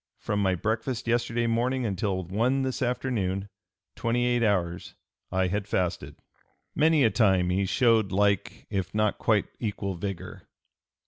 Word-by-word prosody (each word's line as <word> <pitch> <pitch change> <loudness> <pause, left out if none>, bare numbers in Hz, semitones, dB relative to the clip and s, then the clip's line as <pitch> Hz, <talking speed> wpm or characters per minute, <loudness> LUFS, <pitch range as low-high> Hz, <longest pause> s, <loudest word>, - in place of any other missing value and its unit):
From 105 0 -2
my 95 -2 +2
breakfast 110 +5 -2
yesterday 120 0 +1
morning 120 +2 0
until 95 -2 -1
one 115 +9 0
this 130 -1 -3
afternoon, 105 -6 -1 0.5
twenty 120 +1 0
eight 120 -1 +2
hours, 90 -6 0 0.4
I 95 0 +1
had 100 +2 -2
fasted." 90 -3 -2 0.6
Many 155 -1 +4
a 110 - +4
time 95 -6 +3
he 95 +1 +1
showed 115 -2 +3
like, 100 0 0
if 95 0 -3
not 105 -1 +1
quite 105 -3 +2
equal 100 -3 -3
vigor. 95 0 -6
105 Hz, 140 wpm, -27 LUFS, 95-120 Hz, 0.6 s, Many